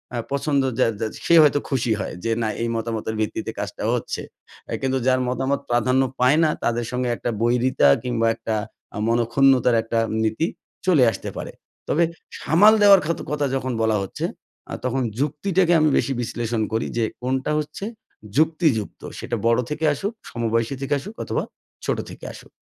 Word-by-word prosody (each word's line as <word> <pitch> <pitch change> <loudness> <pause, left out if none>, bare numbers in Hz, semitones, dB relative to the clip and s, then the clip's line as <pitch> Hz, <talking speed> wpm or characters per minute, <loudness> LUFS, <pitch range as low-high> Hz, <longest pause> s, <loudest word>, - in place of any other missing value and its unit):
আ - - -1
পছন্দ 140 0 +1 0.2
যা 125 - +5
যা 110 - -1 0.2
সে 170 - +5
হয়তো 145 -1 +4
খুশি 125 -4 0
হয় 95 - -4
যে, 115 - 0
না 110 - +1
এই 115 - 0
মতামতের 110 -1 -3
ভিত্তিতে 105 - -2
কাজটা - - -5
হচ্ছে। - - -3 0.5
এ - - -2
কিন্তু 130 0 0
যার 130 0 +4
মতামত 135 +2 0
প্রাধান্য 125 +2 +2 0.2
পায় 130 +5 +4
না, 155 - +4
তাদের 120 0 0
সঙ্গে 125 0 -1
একটা 120 - -3
বৈরিতা 120 - +3 0.2
কিংবা 115 -2 0
একটা 110 -1 -3 0.4
আ - - -5
মনঃক্ষুণ্ণতার 120 +2 +3
একটা 115 0 -1 0.2
নীতি 110 +9 0 0.4
চলে 165 -9 +5
আসতে - - -6
পারে। - - -5 0.4
তবে 170 - +2 0.4
সামাল 205 +7 +6
দেওয়ার 200 -2 +8
খাতো 170 +2 -2
কথা 145 -1 0
যখন 130 -1 -2
বলা 110 -1 +2
হচ্ছে, 95 - -4 0.5
আ - - -4
তখন 130 +1 0 0.2
যুক্তিটাকে 170 +5 +1
আমি 155 - +4
বেশি 135 - +1
বিশ্লেষণ 115 -1 -2
করি 110 - 0
যে, 115 - +2 0.2
কোনটা 130 +3 -1
হচ্ছে 150 +6 -5 0.5
যুক্তিযুক্ত? 155 - +1 0.2
সেটা - - -3
বড়ো 115 +2 +3
থেকে 150 +1 -2
আসুক, 195 +10 -3 0.2
সমবয়সী 115 +2 -1
থেকে 135 - -1
আসুক 205 +10 -9
অথবা - - -2 0.4
ছোটো - - -1
থেকে - - -11
আসুক। - - -13
130 Hz, 170 wpm, -23 LUFS, 115-150 Hz, 0.5 s, দেওয়ার